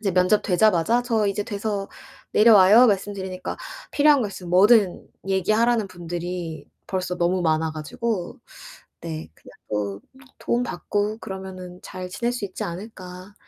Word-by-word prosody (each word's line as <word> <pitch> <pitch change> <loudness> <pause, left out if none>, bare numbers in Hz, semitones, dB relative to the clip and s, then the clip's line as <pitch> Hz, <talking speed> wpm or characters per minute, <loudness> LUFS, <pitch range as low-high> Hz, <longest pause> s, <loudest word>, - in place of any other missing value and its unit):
이제 200 -3 -1
면접 185 +4 +3
되자마자 215 +4 +3
"저 225 -4 +1
이제 200 +1 -1
돼서 205 -1 -3 0.4
내려와요." 215 +1 +7
말씀드리니까 195 -3 -2 0.3
필요한 290 -2 +4
거 210 - -2
있으면 180 -3 -9
뭐든 200 +1 +4 0.2
얘기하라는 215 +3 +2
분들이 175 -3 -5 0.2
벌써 180 -1 -3
너무 175 +1 +1
많아 160 -1 +1
가지고 180 +5 -4 0.6
네 80 0 -6
그냥 - - -17 0.2
뭐 100 -1 -3 0.4
'도움 240 +1 0
받고 210 0 -2
그러면은 185 -3 -8
잘 185 0 -7
지낼 235 +6 -2
수 245 -4 -4
있지 190 -2 -6
않을까.' 185 +1 -8
190 Hz, 310 characters per minute, -23 LUFS, 180-215 Hz, 0.6 s, 내려와요